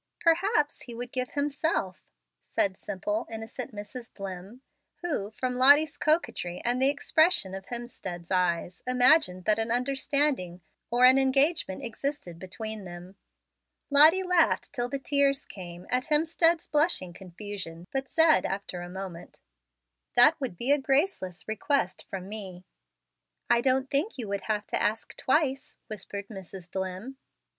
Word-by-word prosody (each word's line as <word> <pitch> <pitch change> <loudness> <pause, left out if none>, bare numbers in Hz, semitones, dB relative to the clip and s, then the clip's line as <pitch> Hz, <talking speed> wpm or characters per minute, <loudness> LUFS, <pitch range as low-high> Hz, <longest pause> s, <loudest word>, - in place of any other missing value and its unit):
"Perhaps 335 -1 +2
he 240 - -9
would 245 +1 -6
give 255 -1 -3
himself," 285 - -1 0.4
said 190 -1 0
simple, 205 +4 -3
innocent 225 +2 -6
Mrs. 215 +3 -9
Dlimm, 195 +4 -8 0.4
who, 290 - -1
from 250 +3 -3
Lottie's 285 +4 +6
coquetry 305 - 0
and 245 +2 +2
the 265 - +5
expression 290 - +2
of 195 -1 -7
Hemstead's 195 -8 -7
eyes, 180 -1 0
imagined 250 - +4
that 215 0 +3
an 225 +1 0
understanding 260 -6 0 0.3
or 245 +1 +4
an 260 +1 +7
engagement 270 - +2
existed 235 - -5
between 215 +3 -5
them. 175 +1 -10 0.8
Lottie 315 +6 +7
laughed, 360 -2 +2
till 245 -2 -1
the 275 - -2
tears 280 0 +1
came, 175 -2 -10
at 250 +1 +1
Hemstead's 325 +2 +2
blushing 295 - +1
confusion, 180 -2 -8
but 270 0 -2
said 320 -1 +4
after 195 -2 -4
a 175 - -7
moment, 185 -2 -8 0.8
"That 245 +6 +7
would 250 -10 -4
be 245 +8 0
a 290 - +4
graceless 270 - -1
request 220 -1 -1
from 190 -1 -6
me." 190 -4 -7 0.9
"I 235 - +5
don't 260 +1 +1
think 290 +6 0
you 235 -4 -5
would 200 -1 -2
have 210 -1 -1
to - - -2
ask 220 +2 -1
twice," 270 -1 0
whispered 200 -1 -6
Mrs. 190 -3 -10
Dlimm. 190 +7 -5
240 Hz, 140 wpm, -28 LUFS, 190-280 Hz, 0.9 s, an